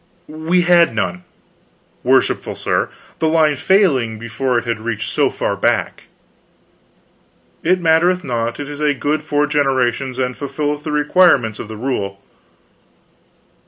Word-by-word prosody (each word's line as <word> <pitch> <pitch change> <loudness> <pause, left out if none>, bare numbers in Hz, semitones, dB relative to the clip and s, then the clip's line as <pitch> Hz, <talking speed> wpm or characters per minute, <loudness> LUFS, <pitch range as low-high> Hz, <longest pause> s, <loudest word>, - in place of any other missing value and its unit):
"We 160 +4 0
had 175 -7 +4
none, 90 -4 -2 0.8
worshipful - - +1
sir, - - -1 0.3
the 160 - +1
line 155 -2 +3
failing 140 - +2
before 115 +3 -2
it 120 - -2
had 115 -2 -2
reached 110 -1 -4
so - - +2
far - - -2
back." - - -1 1.6
"It 180 +3 +2
mattereth 175 +2 +2
not. 120 -1 -3
It 145 - -5
is 145 0 -8
a 150 -1 +1
good 150 +4 -1
four 150 -1 0
generations, 135 -3 0
and 125 -1 -1
fulfilleth 145 +1 -3
the 155 - -4
requirements 150 - +3
of - - -6
the 110 0 -8
rule." 100 -5 -3
145 Hz, 135 wpm, -18 LUFS, 120-155 Hz, 1.6 s, had